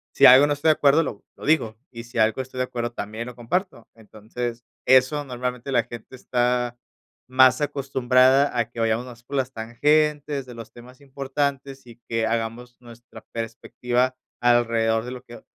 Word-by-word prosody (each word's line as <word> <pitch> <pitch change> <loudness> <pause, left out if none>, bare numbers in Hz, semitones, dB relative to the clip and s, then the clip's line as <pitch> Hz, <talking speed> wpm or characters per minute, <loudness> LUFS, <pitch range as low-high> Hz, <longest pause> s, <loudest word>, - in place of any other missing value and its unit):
si - - +6
algo 130 +3 +8
no 145 - +1
estoy 145 +2 -2
de 155 - +7
acuerdo, 145 +2 +4
lo - - -6
lo - - -11
digo, 140 -8 +1
y 115 -2 -9
si 120 +1 -10
algo 110 +2 +2
estoy 130 0 -9
de 125 - +1
acuerdo, 120 -1 -4
también 110 0 -6
lo 125 -1 -9
comparto. 125 - -3
Entonces, 115 +2 -7 0.2
eso 130 +3 +4
normalmente 125 0 -5
la 120 -3 +2
gente 120 +2 -10
está 125 -1 -1 0.5
más 130 +1 +4
acostumbrada 135 -1 +2
a 120 -1 0
que 120 - -10
vayamos 115 +2 0
más 120 -1 -13
por 140 +2 -5
las 130 -1 -1
tangentes, 145 +4 0
de 125 - -11
los 115 -1 -10
temas 125 +3 -15
importantes, 135 -1 -4
y 115 - -13
que 115 -1 -1
hagamos 115 +2 -4
nuestra 120 0 -14
perspectiva 120 +2 -2 0.2
alrededor 115 -2 +2
de 125 - -6
lo 125 - -8
que 120 - -13
125 Hz, 175 wpm, -23 LUFS, 115-135 Hz, 0.5 s, algo